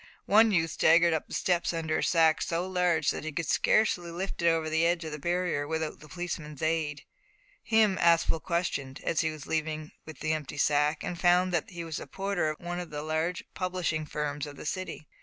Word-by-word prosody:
One 220 +3 +6
youth 165 -5 +1
staggered 170 +1 +5
up 160 - -2
the - - -10
steps 175 -1 +1
under 160 -1 -1
a - - -1
sack 160 -2 +3
so 170 +2 -1
large 180 -5 +2
that - - -5
he 155 - -4
could 165 +3 -3
scarcely 180 -5 +2
lift 180 +3 -4
it 170 - +3
over 165 -1 +1
the 160 +1 +1
edge 170 0 +2
of 160 - -5
the 150 - -5
barrier 175 -2 -1
without 160 0 -3
the 155 - -13
policeman's 165 -5 -5
aid. 155 -2 -1 0.6
Him 220 -4 +3
Aspel 165 -1 +3
questioned, 150 -6 -2
as 165 - +1
he 160 - 0
was 155 -2 -8
leaving 155 -1 -2 0.2
with 160 -3 -10
the 155 0 +1
empty 150 -2 -5
sack, 150 +1 +2
and 175 - -4
found 180 +1 +4
that 170 - 0
he 175 -3 -6
was 160 -2 -5
the - - -7
porter 195 -5 -1
of 155 - -5
one 175 0 -4
of 175 -2 -6
the 150 0 -5
large 160 +3 -1
publishing 180 -4 -2
firms 150 0 -3
of 145 - -9
the - - -9
city. 185 -2 -4
165 Hz, 215 wpm, -29 LUFS, 155-175 Hz, 0.6 s, One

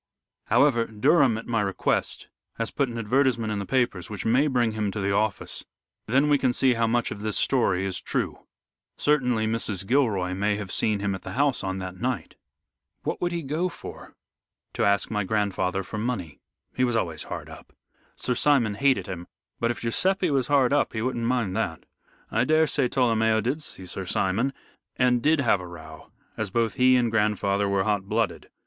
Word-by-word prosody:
However, 120 -5 +3
Durham, 125 +2 +3
at 115 - -7
my 115 -2 0
request, 100 -2 -1 0.3
has 115 -1 -2
put 140 -3 0
an 120 - -6
advertisement 115 -1 +1
in 105 - -2
the 100 - -5
papers 120 -9 0
which 105 -3 -5
may 125 +6 +3
bring 120 -5 +1
him 110 -1 -2
to 105 - -4
the 100 0 0
office, 105 0 -1 0.4
then 135 +6 +3
we 145 -1 +3
can 130 -2 +2
see 130 0 +3
how 115 -1 +1
much 120 +1 0
of 100 - -6
this 105 -1 0
story 95 -8 +2
is 95 -2 -2
true. - - -3 0.5
Certainly, 125 -7 +2
Mrs. 110 -4 -1
Gilroy 100 -7 +1
may 105 +2 0
have 100 -3 -5
seen 105 -2 +1
him 100 -1 0
at 95 - -6
the - - -7
house 140 -3 +1
on 95 0 -2
that 95 -1 -6
night." 125 -1 -2 0.7
"What - - -3
would 175 - 0
he 170 -1 -3
go 155 +6 -1
for?" - - -11 0.6
"To - - -1
ask 100 +2 +2
my 105 -1 0
grandfather 95 -2 -1
for 105 +3 -6
money. 105 - -3 0.3
He 130 - 0
was 120 -2 +1
always 85 -8 -1
hard - - -6
up. - - -13 0.4
Sir 125 - -1
Simon 125 -4 +3
hated 135 +5 +2
him, 90 -2 -7 0.3
but 115 - +1
if 120 - -3
Guiseppe 185 - +1
was 135 -3 +1
hard 140 -2 +3
up 145 - +1
he 110 -1 -2
wouldn't 120 -2 -1
mind 120 -7 0
that. 95 -8 -3 0.5
I 115 - +2
daresay 155 -2 +2
Tolomeo 110 -3 +2
did 130 +8 -2
see 95 -9 -7
Sir 95 +1 -5
Simon, 100 +9 +1 0.4
and 125 -1 +2
did 155 +3 +3
have 110 -7 +2
a 90 - -8
row, 80 -2 -12 0.3
as 110 -2 -2
both 115 +1 0
he 130 0 +4
and 120 -2 +2
grandfather 105 -2 +1
were 100 -1 +1
hot 100 -1 0
blooded. 115 +1 -1
115 Hz, 195 wpm, -25 LUFS, 100-130 Hz, 0.7 s, he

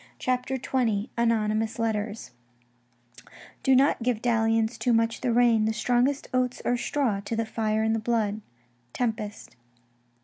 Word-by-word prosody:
CHAPTER 255 +1 -1
XX 235 -5 -1
ANONYMOUS 225 -1 0
LETTERS 220 -1 -2 1.3
Do 265 - +4
not 270 0 +3
give 240 -2 0
dalli 225 -1 +2
ance 225 +1 -1
Too 245 - +1
much 230 0 +1
the 250 - 0
rein; 230 -2 +4
the 220 - 0
strongest 245 +4 +1
oaths 255 -1 0
are 245 - +2
straw 240 -4 -1
To 205 +3 -4
the 225 0 -1
fire 220 -1 -1
i' - - +1
the 225 0 +1
blood. 220 -2 -1 0.3
— 120 0 -40
Tempest. 215 - -4
230 Hz, 150 wpm, -26 LUFS, 215-245 Hz, 1.3 s, Do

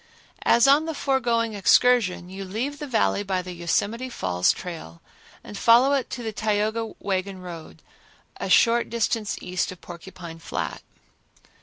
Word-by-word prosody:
As 235 +2 +5
on 285 +3 +5
the 320 - -3
foregoing 235 -5 0
excursion, 205 -2 +3
you 190 +2 -7
leave 235 +10 -4
the 295 - -5
Valley 225 -5 +1
by 190 -2 -2
the 180 - -7
Yosemite 205 +8 -1
Falls 90 - +1
trail 160 - -8 0.4
and - - -10
follow 240 +6 +5
it 270 -3 0
to 245 - -6
the 220 -1 -4
Tioga 220 +1 -1
wagon 190 0 -2
road, 170 -3 -10 0.5
a - - -4
short 235 0 +4
distance 225 -2 -1
east 180 0 -2
of 185 - -11
Porcupine 170 -1 -10
Flat. - - -4
210 Hz, 150 wpm, -24 LUFS, 180-235 Hz, 0.5 s, As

